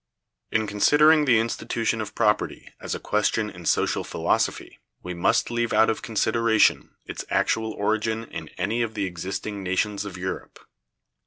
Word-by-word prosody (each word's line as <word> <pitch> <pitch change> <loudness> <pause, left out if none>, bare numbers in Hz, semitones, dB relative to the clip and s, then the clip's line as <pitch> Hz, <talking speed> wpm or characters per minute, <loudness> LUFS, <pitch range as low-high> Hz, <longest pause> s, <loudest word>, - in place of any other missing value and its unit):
In 110 0 +1
considering 150 +9 +4
the 125 -4 +5
institution 115 0 -1
of 105 - -7
property 105 0 0
as - - -4
a - - -5
question 105 0 0
in 85 -2 -9
social - - +1
philosophy, - - -1 0.2
we 90 - -5
must 90 +6 +1
leave 120 0 -1
out 110 - +5
of 110 - -5
consideration 110 0 +2
its - - -6
actual 110 0 +1
origin 110 +2 -1
in - - -6
any 105 +6 -1
of 115 -1 -2
the 100 -2 -1
existing 95 +3 -5
nations 100 +2 -1
of 100 -3 -7
Europe. 90 +1 -5
110 Hz, 155 wpm, -25 LUFS, 100-115 Hz, 0.2 s, the